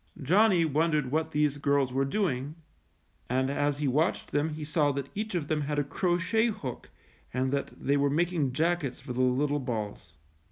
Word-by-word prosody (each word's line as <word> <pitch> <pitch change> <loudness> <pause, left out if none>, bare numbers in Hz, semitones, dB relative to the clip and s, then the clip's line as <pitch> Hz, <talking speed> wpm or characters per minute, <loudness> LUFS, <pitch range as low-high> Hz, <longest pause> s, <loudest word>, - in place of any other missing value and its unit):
Johnny 180 +4 +4
wondered 150 -3 +1
what 160 +1 0
these 150 -2 +1
girls 140 -2 +1
were 135 +1 +1
doing, 145 -4 -1 0.7
and 130 +2 +1
as 145 0 0
he 145 -1 -1
watched 150 +7 0
them 145 +2 +1
he 155 0 -6
saw 150 -1 +2
that 140 0 -4
each 215 -1 -3
of 160 -5 -1
them 155 -1 0
had 145 +1 -2
a 145 - +2
crochet 180 +9 +1
hook 135 - -5 0.4
and 130 +1 0
that 140 0 -1
they 140 +1 +1
were 140 0 +2
making 160 -2 +1
jackets 160 -1 0
for 130 -3 -6
the 125 - 0
little 140 +3 +2
balls. 105 - -5
145 Hz, 185 wpm, -29 LUFS, 135-160 Hz, 0.7 s, Johnny